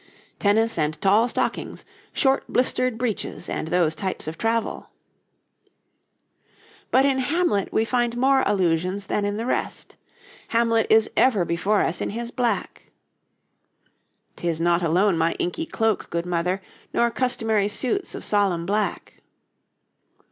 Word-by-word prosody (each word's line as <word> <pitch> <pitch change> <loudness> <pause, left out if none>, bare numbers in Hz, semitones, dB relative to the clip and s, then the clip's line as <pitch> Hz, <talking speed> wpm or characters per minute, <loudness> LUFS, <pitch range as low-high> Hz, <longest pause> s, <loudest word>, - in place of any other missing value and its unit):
'Tennis 220 -1 +2
and 155 0 -1
tall 210 +4 +4
stockings, - - -3 0.3
Short 270 0 +2
blistered 255 -1 +1
breeches 225 -6 -3
and - - -3
those 170 -2 +2
types 185 0 -4
of 160 - -4
travel.' 225 +3 -2 2.0
But 265 +2 +4
in 270 -1 +2
'Hamlet' 270 - 0
we 220 - +1
find 240 0 0
more 265 +2 +4
allusions 185 0 0
than 205 +1 -1
in 205 0 -2
the 225 - -3
rest. - - -3 0.5
Hamlet 230 -1 +2
is 220 0 +4
ever 215 -9 +3
before 195 +5 +1
us 170 - -2
in - - -1
his 235 +3 -5
black: 245 -2 -2 1.5
''Tis 170 -2 -2
not 170 +1 +2
alone 175 +2 +2
my 165 +1 +2
inky 325 - -3
cloak, 225 -3 -1
good 170 0 -2
mother, 180 +2 -1 0.3
Nor 235 0 +2
customary 225 -5 0
suits 255 - -2
of - - -6
solemn 195 -5 +1
black.' 205 +2 -2
210 Hz, 135 wpm, -23 LUFS, 180-235 Hz, 2.0 s, tall